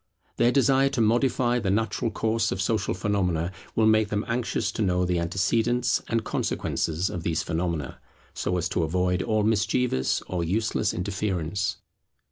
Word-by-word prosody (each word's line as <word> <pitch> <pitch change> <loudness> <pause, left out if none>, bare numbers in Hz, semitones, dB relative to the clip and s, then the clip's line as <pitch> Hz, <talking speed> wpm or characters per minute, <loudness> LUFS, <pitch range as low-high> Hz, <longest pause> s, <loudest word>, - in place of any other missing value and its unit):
Their 120 +1 +4
desire 135 0 +3
to - - +2
modify 120 +2 +2
the 100 -4 -2
natural 110 +3 0
course 110 +1 0
of 95 - -3
social 105 0 0
phenomena 90 -4 0 0.2
will 110 - +3
make 110 -1 +4
them 105 0 -1
anxious 120 0 -1
to - - -4
know 90 -2 +2
the 90 -1 0
antecedents 115 +8 +1
and 115 -1 0
consequences 85 -4 -1
of 90 - -4
these 80 0 -1
phenomena, 80 -4 -3 0.3
so 90 - -1
as 85 0 0
to 85 - 0
avoid 90 +3 0
all 110 0 +1
mischievous 110 - +1
or 90 -2 -3
useless 105 +4 0
interference. 95 -1 -2
100 Hz, 155 wpm, -26 LUFS, 90-115 Hz, 0.3 s, Their